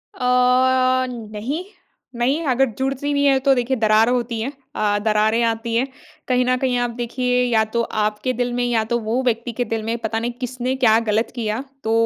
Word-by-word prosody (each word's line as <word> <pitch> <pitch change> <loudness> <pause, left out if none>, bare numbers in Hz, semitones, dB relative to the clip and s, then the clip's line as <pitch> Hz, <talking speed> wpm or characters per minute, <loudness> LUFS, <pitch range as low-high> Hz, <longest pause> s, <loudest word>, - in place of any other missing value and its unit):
अ, 255 0 +3
नहीं, 235 +6 -5 0.5
नहीं 260 +7 +1
अगर 265 0 +3
जुड़ती 270 +2 -1
नहीं 285 0 +2
है 270 -1 +4
तो 275 - +7
देखिए 250 +1 0
दरार 220 0 +4
होती 240 -2 -1
है। 260 +5 -3 0.2
अ, 210 -1 +1
दरारें 215 +1 +2
आती 230 0 -1
है। 250 +4 +1 0.4
कहीं 250 -1 +2
न 255 0 +2
कहीं 255 -1 0
आप 245 0 0
देखिए 250 +1 0
या 230 -3 +2
तो 235 - +2 0.2
आपके 210 +4 -1
दिल 245 0 -2
में 245 0 0
या 235 -2 +1
तो 235 - +2
वो 225 +3 -1
व्यक्ति 235 -1 -1
के - - +3
दिल 225 -2 -3
में 225 +2 -2
पता 225 -1 -2
नहीं 235 +2 -2
किसने 255 +1 -2
क्या 240 -4 +4
गलत 220 +2 +1
किया 225 +1 -2 0.2
तो 220 - -1
245 Hz, 200 wpm, -21 LUFS, 225-255 Hz, 0.5 s, तो